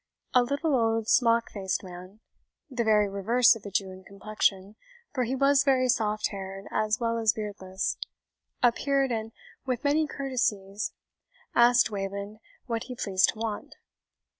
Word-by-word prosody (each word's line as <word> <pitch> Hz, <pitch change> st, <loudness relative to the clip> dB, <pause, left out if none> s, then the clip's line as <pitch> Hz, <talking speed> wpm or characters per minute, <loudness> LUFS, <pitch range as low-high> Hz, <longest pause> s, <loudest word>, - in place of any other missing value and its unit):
A 250 Hz, -, +6 dB
little 280 Hz, +4 st, 0 dB
old 225 Hz, -2 st, +1 dB
smock 230 Hz, -1 st, +3 dB
faced 190 Hz, -2 st, -2 dB
man, 185 Hz, +3 st, -11 dB, 0.5 s
the 245 Hz, -2 st, -1 dB
very 210 Hz, -2 st, +3 dB
reverse 225 Hz, +6 st, +3 dB
of 225 Hz, -, -11 dB
a -, -, -5 dB
Jew 195 Hz, 0 st, -1 dB
in 185 Hz, 0 st, -12 dB
complexion, 200 Hz, 0 st, -2 dB, 0.4 s
for 255 Hz, -3 st, 0 dB
he 255 Hz, +3 st, -2 dB
was 275 Hz, +1 st, +4 dB
very 260 Hz, -2 st, +3 dB
soft 215 Hz, -3 st, +1 dB
haired 195 Hz, 0 st, -7 dB
as 215 Hz, 0 st, 0 dB
well 230 Hz, -1 st, 0 dB
as 225 Hz, -1 st, +3 dB
beardless, 195 Hz, -3 st, -4 dB, 0.7 s
appeared, 270 Hz, +2 st, +2 dB
and 225 Hz, -1 st, -3 dB, 0.3 s
with 255 Hz, -3 st, -3 dB
many 300 Hz, +2 st, +2 dB
courtesies 215 Hz, -8 st, -2 dB, 0.6 s
asked 240 Hz, -1 st, +5 dB
Wayland 200 Hz, +1 st, -5 dB, 0.3 s
what 230 Hz, -3 st, -3 dB
he 250 Hz, -, -7 dB
pleased 195 Hz, -5 st, +2 dB
to -, -, -17 dB
want. 220 Hz, -2 st, -5 dB
220 Hz, 150 wpm, -27 LUFS, 200-250 Hz, 0.7 s, A